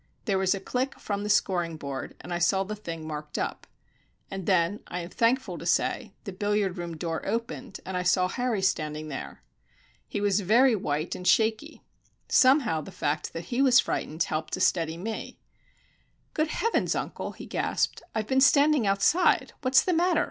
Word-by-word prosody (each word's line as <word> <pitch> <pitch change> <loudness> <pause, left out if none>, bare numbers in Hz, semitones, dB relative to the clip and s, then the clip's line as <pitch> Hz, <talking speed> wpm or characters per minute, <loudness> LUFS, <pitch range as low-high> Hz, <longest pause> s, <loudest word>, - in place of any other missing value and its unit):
There 195 -5 +1
was 190 +1 +2
a - - -4
click 255 +7 -2
from 200 -1 -3
the 210 - -4
scoring 175 -5 +1
board, 140 -3 -6
and 175 - -6
I 175 - -1
saw 190 +3 +2
the 210 +2 -5
thing 165 -6 -7
marked 150 -1 -6
up. - - -3 0.6
And 195 -2 -5
then 185 +1 +2
I 180 - -4
am 170 +1 -8
thankful 230 -7 +1
to - - -8
say 215 +5 0
the 200 - -6
billiard 205 -1 0
room 170 -2 -5
door 165 0 -3
opened, 230 +1 -4
and 190 - -5
I 180 - 0
saw 180 +1 +3
Harry 235 -1 -1
standing 155 -4 -1
there. 135 - -7 0.6
He - - -3
was 205 0 +2
very 230 +6 +4
white 155 -4 -2
and 180 - -5
shaky. 220 -1 +1 0.4
Somehow, 255 - +4
the - - -10
fact 150 +1 -2
that 165 +6 -6
he 250 - +2
was 260 -2 +6
frightened 160 -7 -1
helped 155 0 -3
to - - -1
steady 165 -2 +1
me. 215 +5 -5 1.0
"Good 310 0 +1
heavens, 455 +8 0
uncle!" - - -4
he - - -10
gasped, - - -1
"I've 220 -1 0
been 265 +4 +2
standing 285 -3 +5
outside. 200 - +3
What's 265 -1 +4
the 365 - +1
matter? 345 0 +3
195 Hz, 185 wpm, -27 LUFS, 170-235 Hz, 1.0 s, was